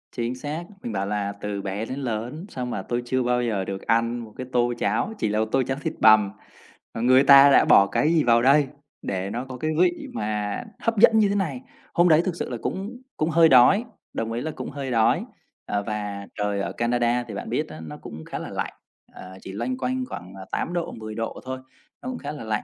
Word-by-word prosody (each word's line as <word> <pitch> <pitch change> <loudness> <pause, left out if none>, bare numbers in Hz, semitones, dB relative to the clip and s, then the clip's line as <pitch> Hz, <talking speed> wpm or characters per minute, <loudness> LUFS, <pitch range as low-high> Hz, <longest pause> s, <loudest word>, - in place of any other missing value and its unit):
Chính 120 +1 -2
xác, 145 +6 -5 0.2
mình 120 - -4
bảo 100 -2 -1
là 100 0 -2
từ 105 -1 -3
bé 100 +3 -3
đến 130 +4 -5
lớn 125 - -4
sao 125 - -4
mà 125 - -3
tôi 120 0 -2
chưa 130 +1 0
bao 125 0 +1
giờ 105 -5 -1
được 95 0 -5
ăn 115 +1 +1
một 110 -3 -10
cái 130 - -6
tô 120 -1 +2
cháo, 110 - 0
chỉ 110 - 0
là 105 +1 0
một 110 - +2
tô 135 - +3
cháo 135 +2 -3
thịt - - -2
bằm, 110 -2 +6 0.6
mà 115 - -4
người 130 +3 +5
ta 140 0 +9
đã - - +6
bỏ 100 - +6
cái 155 +10 +1
gì 160 -3 +3
vào 115 -1 +4
đây 140 +3 +5 0.3
để 95 0 -3
nó 120 +5 -4
có 130 -1 -8
cái 155 +5 -1
vị 175 -1 +2
mà 105 -2 -2 0.2
hấp 230 -1 -1
dẫn 220 +1 +7
như 210 -2 +4
thế 200 - 0
này? 160 -11 -1 0.3
Hôm 175 +1 +4
đấy 155 0 +6
thực 185 - -1
sự - - -4
là 125 - -4
cũng 215 +7 -4 0.2
cũng 155 - 0
hơi 165 0 +5
đói, 135 - +6 0.3
đồng 115 0 -3
ý 120 - -2
là 160 - -3
cũng - - -7
hơi 140 -2 -5
đói. 115 -2 +2 0.4
Ờ, 100 0 -1
và 100 -1 -4
trời 105 -1 -1
ở - - -3
Canada 120 +1 +1
thì 110 - -7
bạn 100 - -6
biết - - -1
á 80 0 -9
nó 75 - -8
cũng 80 +1 -10
khá - - -5
là - - -6
lạnh, - - -4 0.4
ờ, 95 0 -11
chỉ - - -8
loanh 120 +6 -3
quanh 130 0 -2
khoảng, 95 -4 -8
ờ, 95 -1 -9
8 175 - -2
độ, 175 -1 -2
10 110 -1 -8
độ 115 0 -4
thôi, 130 0 -4 0.4
nó 250 - -5
cũng 255 - -4
khá 145 -7 -6
là 150 - -7
lạnh. 110 -1 -2
120 Hz, 245 wpm, -24 LUFS, 105-140 Hz, 0.6 s, ta